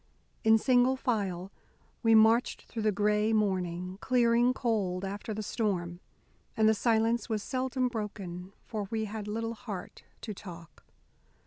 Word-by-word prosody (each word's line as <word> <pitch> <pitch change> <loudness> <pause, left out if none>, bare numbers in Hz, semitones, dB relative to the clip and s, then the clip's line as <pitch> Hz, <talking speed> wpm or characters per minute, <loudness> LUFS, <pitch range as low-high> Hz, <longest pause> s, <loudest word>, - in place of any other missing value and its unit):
In 220 0 +6
single 250 +2 +3
file 195 -7 -2 0.5
we 225 -1 +5
marched 225 +2 +4
through 225 - -6
the 215 0 +2
gray 210 +2 +2
morning, 185 -3 -1
clearing 240 -1 +3
cold 205 -8 -1
after 200 +3 -5
the 215 0 -3
storm, 185 -6 -2 0.6
and 220 -1 +4
the 220 - +6
silence 225 +1 +1
was 215 -2 -1
seldom 255 -1 -1
broken, 195 -6 -5
for 210 -3 -4
we 220 -1 -1
had 210 0 -6
little 225 +2 -2
heart 215 -6 -8 0.2
to 215 - -5
talk. 170 -4 -11
215 Hz, 140 wpm, -30 LUFS, 195-230 Hz, 0.6 s, In